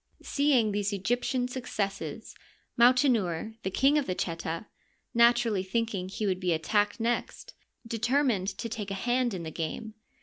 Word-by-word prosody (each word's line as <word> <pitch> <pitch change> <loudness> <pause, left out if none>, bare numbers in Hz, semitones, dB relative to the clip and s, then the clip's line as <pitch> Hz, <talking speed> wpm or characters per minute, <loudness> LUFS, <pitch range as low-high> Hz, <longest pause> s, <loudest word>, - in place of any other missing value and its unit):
Seeing 275 -7 +2
these 205 0 -1
Egyptian 245 +5 0
successes, 215 - -4 0.4
Mautenouer, 235 - +3
the 190 - -2
king 275 +9 +3
of 285 - -3
the 185 - -1
Cheta, 165 +1 -3 0.5
naturally 235 -3 +4
thinking 195 -1 -2
he 210 +2 -3
would 185 -2 0
be 180 -2 +1
attacked 205 +8 +1
next, 240 - -2 0.3
determined 230 -3 +1
to 195 +4 -3
take 220 -3 -5
a 195 - -3
hand 240 +1 0
in 175 - -5
the 160 - -5
game. 170 +8 -4
220 Hz, 145 wpm, -29 LUFS, 190-245 Hz, 0.5 s, naturally